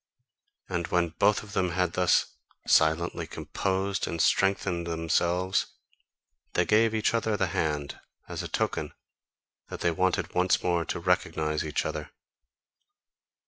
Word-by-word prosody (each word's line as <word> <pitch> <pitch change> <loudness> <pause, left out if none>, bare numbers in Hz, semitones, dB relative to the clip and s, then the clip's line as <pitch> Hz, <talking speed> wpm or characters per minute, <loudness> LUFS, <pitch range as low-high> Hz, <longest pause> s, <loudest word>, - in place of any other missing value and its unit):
And 85 -2 -2
when 85 -1 +1
both 100 +6 +2
of 105 -1 -12
them 90 -2 +1
had 90 -1 0
thus 90 -1 +3 0.4
silently 80 +2 +2
composed 95 0 -2
and 85 - -4
strengthened 95 -2 +1
themselves, 85 +3 0 0.9
they - - +2
gave 110 +1 +3
each 110 +1 +1
other 110 -2 0
the 95 - +2
hand, 75 -2 -2 0.3
as - - -4
a - - -5
token - - -2 0.7
that - - -7
they 85 - +2
wanted 95 +3 0
once 90 +1 +2
more 85 -2 +1
to - - -3
recognise 80 -3 0
each 75 -1 -2
other. - - -4
90 Hz, 135 wpm, -28 LUFS, 85-95 Hz, 0.9 s, thus